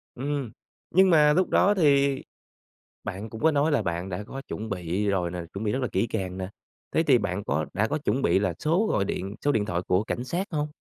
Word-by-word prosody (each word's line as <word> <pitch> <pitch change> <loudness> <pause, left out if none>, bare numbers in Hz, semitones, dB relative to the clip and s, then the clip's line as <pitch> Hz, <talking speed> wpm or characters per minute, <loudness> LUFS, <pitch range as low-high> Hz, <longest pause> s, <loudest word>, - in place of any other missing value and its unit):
Ừm, 140 -2 -3 0.4
nhưng 190 +1 +5
mà 150 -3 +6
lúc 185 +4 +2
đó 205 - +4
thì 140 -6 +3 0.8
bạn 100 +4 -5
cũng 110 - -9
có 160 - +5
nói 150 +2 +2
là 145 - +2
bạn 85 +2 -3
đã 95 +2 -4
có 135 +6 -7
chuẩn 110 +1 -5
bị 95 +1 -2
rồi 90 -4 0
nè, 90 - -4
chuẩn 100 - -4
bị 105 - 0
rất 130 - -1
là 125 - 0
kỹ 95 +5 +1
càng 95 -4 -3
nè, 95 0 -4 0.4
thế 160 - +2
thì 135 -5 +5
bạn 100 -2 -2
có 75 0 -1
đã 105 +4 +1
có 150 - -1
chuẩn 135 -3 -1
bị 95 - +3
là 95 -4 0
số 175 +8 +2
gọi 100 - +1
điện 95 +1 -4
số 145 - +4
điện 110 -6 +1
thoại 90 -2 -1
của 90 +3 +2
cảnh 120 - -3
sát 175 +9 -2
hông? 150 -2 -1
110 Hz, 245 wpm, -26 LUFS, 95-145 Hz, 0.8 s, mà